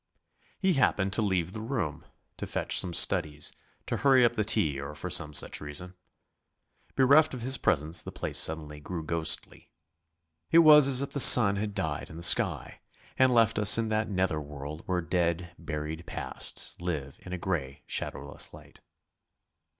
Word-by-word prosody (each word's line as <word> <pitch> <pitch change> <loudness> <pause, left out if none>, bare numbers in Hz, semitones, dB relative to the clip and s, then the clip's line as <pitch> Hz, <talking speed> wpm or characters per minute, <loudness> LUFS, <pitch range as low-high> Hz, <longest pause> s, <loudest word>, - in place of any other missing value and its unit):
He 190 -1 0
happened 100 - 0
to 110 - +1
leave 95 -4 -2
the 110 - -7
room 90 - -5 0.3
to - - -7
fetch - - 0
some 90 - 0
studies, 75 -2 +2 0.3
to - - -3
hurry 130 -3 +3
up 120 - 0
the 110 - -1
tea 80 -10 -1
or 70 +2 -8
for - - -7
some 75 - +2
such 75 - +3
reason. 75 +5 -6 1.0
Bereft 140 +2 +3
of 120 - -8
his 130 +2 0
presence 80 +1 +1
the - - -9
place - - -2
suddenly 75 -2 -2
grew 80 +2 -7
ghostly. 80 0 -3 0.8
It - - +3
was 150 -2 +7
as 135 0 +3
if 140 - -7
the 140 - -4
sun 110 -6 +8
had 105 0 -5
died 75 -3 -4
in 80 - -11
the 85 - -1
sky - - +1 0.4
and 130 -1 +4
left 115 -3 +2
us 105 +1 +6
in 115 -1 -2
that 110 0 -2
nether 95 -5 -2
world 75 +1 -9
where 90 -1 -1
dead, 85 0 -2
buried 80 0 -7
pasts - - -1
live 75 -6 -6
in 90 - -11
a 90 - -4
grey, 80 -7 -5
shadowless - - -5
light. - - -18
90 Hz, 175 wpm, -27 LUFS, 75-115 Hz, 1.0 s, sun